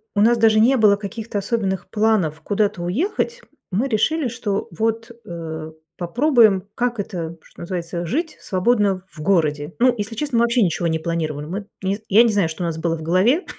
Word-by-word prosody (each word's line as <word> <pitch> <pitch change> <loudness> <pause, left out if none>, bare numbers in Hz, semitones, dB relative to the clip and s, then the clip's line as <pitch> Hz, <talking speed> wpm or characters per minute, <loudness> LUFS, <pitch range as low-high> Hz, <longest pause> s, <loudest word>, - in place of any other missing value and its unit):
у 205 - +3
нас 235 +2 +5
даже 220 -1 +4
не 255 +4 +5
было 210 -2 +5
каких-то 210 +1 -6
особенных 200 -3 -2
планов 210 -8 +1
куда-то 205 -1 0
уехать. 390 - -1 0.3
Мы 225 +9 0
решили, 270 +6 +1
что 220 -4 -3
вот, 225 +5 -2
э, 160 -2 -6 0.3
попробуем, 215 - +3
как 240 -2 -1
это, 170 -4 -4
что - - -20
называется, 170 -1 -4
жить 320 - -2
свободно 195 -1 +1
в 155 - -11
городе. 155 -3 +1
Ну, 250 0 +5
если 210 +2 -4
честно, 285 -2 -1
мы 235 - +4
вообще 235 0 +2
ничего 170 -1 0
не 160 0 0
планировали. 155 -3 -3
Мы 195 +5 -5 0.2
н 195 +2 0
я 220 +4 +6
не 230 - +2
знаю, 190 -5 +2
что 170 +3 -5
у - - 0
нас 165 -1 -2
было 165 0 -1
в - - -9
голове, 190 - +2
200 Hz, 190 wpm, -21 LUFS, 170-230 Hz, 0.3 s, я